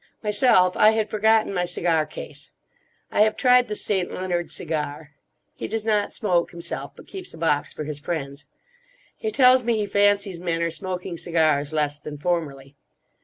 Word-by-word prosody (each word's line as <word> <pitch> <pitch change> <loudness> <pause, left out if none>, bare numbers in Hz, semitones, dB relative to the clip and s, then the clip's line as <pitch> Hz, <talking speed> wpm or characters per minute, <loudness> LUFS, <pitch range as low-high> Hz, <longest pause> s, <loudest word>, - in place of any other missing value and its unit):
Myself 205 -4 +3
I 215 - +6
had 220 -1 -1
forgotten 220 -1 +3
my 180 -1 0
cigar 165 -3 0
case. - - -10 0.6
I - - +2
have 215 0 +3
tried 250 -1 +5
the 210 - -4
St. 190 -3 -1
Leonard 175 -2 -2
cigar. 150 -1 -4 0.4
He - - -6
does 220 0 -4
not 210 -2 +1
smoke 180 -5 0
himself; 170 -1 -6
but - - -14
keeps 375 - -9
a - - -12
box 155 -3 0
for 155 - -6
his 150 -1 -6
friends. 145 -2 -5 0.7
He 440 - -3
tells 255 -8 +5
me 235 -1 +1
he 210 - 0
fancies 200 -2 +1
men 170 -1 -1
are 170 - 0
smoking 180 +1 -5
cigars 155 -4 +1
less 150 -2 -1
than 150 0 -8
formerly. 145 -4 -3
180 Hz, 170 wpm, -24 LUFS, 155-210 Hz, 0.7 s, I